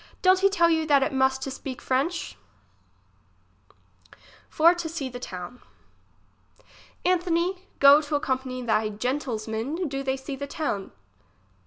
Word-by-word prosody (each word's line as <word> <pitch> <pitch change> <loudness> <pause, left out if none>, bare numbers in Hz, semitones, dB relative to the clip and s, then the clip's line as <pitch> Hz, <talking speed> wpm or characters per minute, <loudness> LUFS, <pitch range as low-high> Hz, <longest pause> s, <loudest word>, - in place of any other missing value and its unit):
Don't 370 0 +5
he 395 +1 +4
tell 345 -4 +3
you 320 -1 +1
that 280 -2 +4
it 275 - -2
must 265 0 +1
to 270 - -4
speak 260 -1 -6
f - - -15
rench? 305 +7 0 2.1
For 335 +2 +5
to 345 -2 -5
see 310 -5 -4
the 245 0 -8
tovcn. 185 +2 -8 1.5
Anthony, 360 +1 0
go 280 +2 +7
to 295 0 -3
accompany 260 -3 -2
they 220 -2 +1
gentilsmen, 245 - -3
do 275 -1 -4
they 265 0 -1
see 265 +1 -6
the 280 +1 -6
town. 280 -10 -3
275 Hz, 140 wpm, -26 LUFS, 255-330 Hz, 2.1 s, go